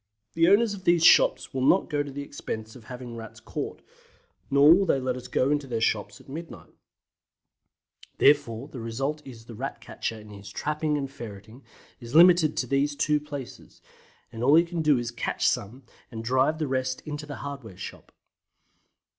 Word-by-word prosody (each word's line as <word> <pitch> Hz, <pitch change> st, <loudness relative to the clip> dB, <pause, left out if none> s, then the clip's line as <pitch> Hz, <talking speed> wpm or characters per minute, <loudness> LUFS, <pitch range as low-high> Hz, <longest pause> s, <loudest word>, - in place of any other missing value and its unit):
The 165 Hz, 0 st, +3 dB
owners 205 Hz, +3 st, +4 dB
of 195 Hz, -2 st, -9 dB
these 170 Hz, -1 st, +4 dB
shops -, -, +5 dB
will 130 Hz, -, -2 dB
not 175 Hz, +9 st, +4 dB
go 150 Hz, -4 st, -1 dB
to 145 Hz, -, -5 dB
the 140 Hz, +1 st, -5 dB
expense 110 Hz, -6 st, -7 dB
of 120 Hz, -4 st, -14 dB
having 125 Hz, -1 st, -8 dB
Rats 115 Hz, -1 st, -9 dB
caught, -, -, -6 dB, 0.7 s
nor 140 Hz, +3 st, +7 dB
will 195 Hz, +3 st, +3 dB
they 135 Hz, -, +2 dB
let 130 Hz, -1 st, -2 dB
us 125 Hz, 0 st, -8 dB
go 130 Hz, +2 st, +1 dB
into 145 Hz, -2 st, 0 dB
their 115 Hz, -3 st, -2 dB
shops 105 Hz, -2 st, -1 dB
at -, -, -19 dB
midnight; 160 Hz, +5 st, -9 dB, 1.4 s
therefore 140 Hz, -4 st, +3 dB
the 135 Hz, -, -9 dB
result 135 Hz, +7 st, -3 dB
is 115 Hz, -4 st, -11 dB
the 115 Hz, -, -10 dB
Rat 125 Hz, +2 st, -5 dB
catcher 110 Hz, 0 st, -5 dB
in 105 Hz, 0 st, -13 dB
his 100 Hz, 0 st, -10 dB
trapping 150 Hz, 0 st, -1 dB
and 135 Hz, -2 st, -4 dB
ferreting 110 Hz, +1 st, -10 dB, 0.4 s
is 120 Hz, +2 st, -8 dB
limited 170 Hz, -2 st, +6 dB
to -, -, 0 dB
these 140 Hz, +3 st, 0 dB
two 150 Hz, +1 st, +1 dB
places, 145 Hz, -4 st, -9 dB, 0.5 s
and 115 Hz, 0 st, -6 dB
all 140 Hz, +4 st, +6 dB
he 165 Hz, -, +7 dB
can 170 Hz, -1 st, -4 dB
do 150 Hz, -3 st, +4 dB
is 120 Hz, -1 st, -3 dB
to -, -, -10 dB
catch -, -, 0 dB
some 120 Hz, +7 st, -2 dB, 0.3 s
and 115 Hz, -3 st, -7 dB
drive 130 Hz, +6 st, +2 dB
the 155 Hz, -2 st, -2 dB
rest 130 Hz, -1 st, -2 dB
into 150 Hz, -1 st, -7 dB
the 145 Hz, -, -6 dB
hardware 135 Hz, -9 st, -8 dB
shop. -, -, -9 dB
135 Hz, 190 wpm, -26 LUFS, 115-150 Hz, 1.4 s, nor